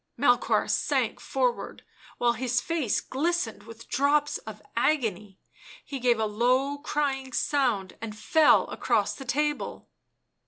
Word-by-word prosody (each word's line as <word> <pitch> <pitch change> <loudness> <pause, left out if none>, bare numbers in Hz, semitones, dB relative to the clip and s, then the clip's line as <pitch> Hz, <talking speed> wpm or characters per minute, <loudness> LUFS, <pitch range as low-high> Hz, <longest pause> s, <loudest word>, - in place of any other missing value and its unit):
Melchoir 245 -1 +3
sank - - 0
forward, - - -2 0.3
while 240 -1 +2
his 245 0 0
face 305 -7 0
glistened 285 -6 -2
with 230 0 -12
drops 290 +2 +1
of - - -10 0.2
agony; 215 - 0 0.5
he 275 -2 -5
gave 240 -2 +2
a 220 - +1
low 255 +6 +1
crying 275 -3 -2
sound 240 -10 0
and 215 -2 -6
fell 305 +8 +4
across - - 0
the 270 - -9
table. 295 +4 -2
260 Hz, 125 wpm, -27 LUFS, 230-295 Hz, 0.5 s, fell